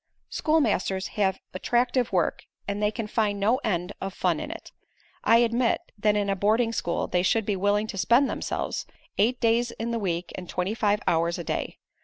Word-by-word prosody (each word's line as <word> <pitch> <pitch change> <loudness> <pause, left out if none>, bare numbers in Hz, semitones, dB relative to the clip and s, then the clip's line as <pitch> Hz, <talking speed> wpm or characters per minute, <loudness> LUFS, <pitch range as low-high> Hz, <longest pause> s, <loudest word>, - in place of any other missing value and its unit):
"Schoolmasters 210 - +1
have 195 -2 0 0.2
attractive 245 +5 +1
work 180 -3 0 0.2
and 200 +1 -2
they 210 - +3
can 220 +1 -4
find 210 -1 0
no 220 +5 +3
end 195 -7 -2
of 195 0 -4
fun - - +1
in - - -5
it. - - -8 0.5
I 230 - +6
admit 235 +1 +2 0.2
that 210 0 +2
in 205 -1 +1
a 195 - +1
boarding 220 +4 +2
school 170 -6 -1
they 180 - +1
should 220 +4 +2
be 205 - 0
willing 205 +2 +1
to 195 -3 -5
spend 240 +9 +4
themselves, - - -3 0.3
eight 240 +5 +3
days 235 +1 +2
in 235 0 -4
the 230 - -1
week 175 -3 -2
and 180 -2 -8
twenty 180 +3 -1
five 210 -2 +1
hours 170 +1 +1
a 170 - -5
day. - - -3
210 Hz, 195 wpm, -26 LUFS, 190-230 Hz, 0.5 s, I